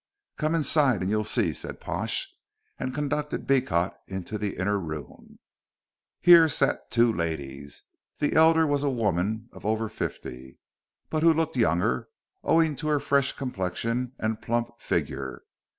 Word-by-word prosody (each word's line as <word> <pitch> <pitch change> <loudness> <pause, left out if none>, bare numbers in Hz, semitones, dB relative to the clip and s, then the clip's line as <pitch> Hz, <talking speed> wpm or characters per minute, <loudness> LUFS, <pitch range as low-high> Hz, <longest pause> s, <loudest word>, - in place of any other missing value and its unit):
"Come 155 +1 0
inside 145 - +3
and 95 - -1
you'll 105 0 +1
see," 105 - +1
said - - -6
Pash, - - -2 0.5
and 130 0 -2
conducted 150 +1 -2
Beecot 100 -10 +1
into 95 +2 -5
the 105 -1 -3
inner 100 +3 0
room. 75 -6 -8 0.8
Here 170 -2 +8
sat - - 0
two 115 -1 +3
ladies. 70 -5 -4 0.3
The 145 - 0
elder 160 0 +5
was 145 -2 +1
a 145 - +1
woman 110 -2 -1
of - - -13
over 110 +1 0
fifty, 65 -7 -6 0.5
but 155 - 0
who 165 +1 +6
looked 160 -1 0
younger, 85 - +1 0.4
owing 160 -2 +3
to 155 - -4
her 150 -1 +2
fresh 140 -1 +1
complexion 115 +2 -3
and 110 0 -2
plump 120 +1 -1
figure. 65 -2 -3
115 Hz, 145 wpm, -26 LUFS, 90-145 Hz, 0.8 s, Here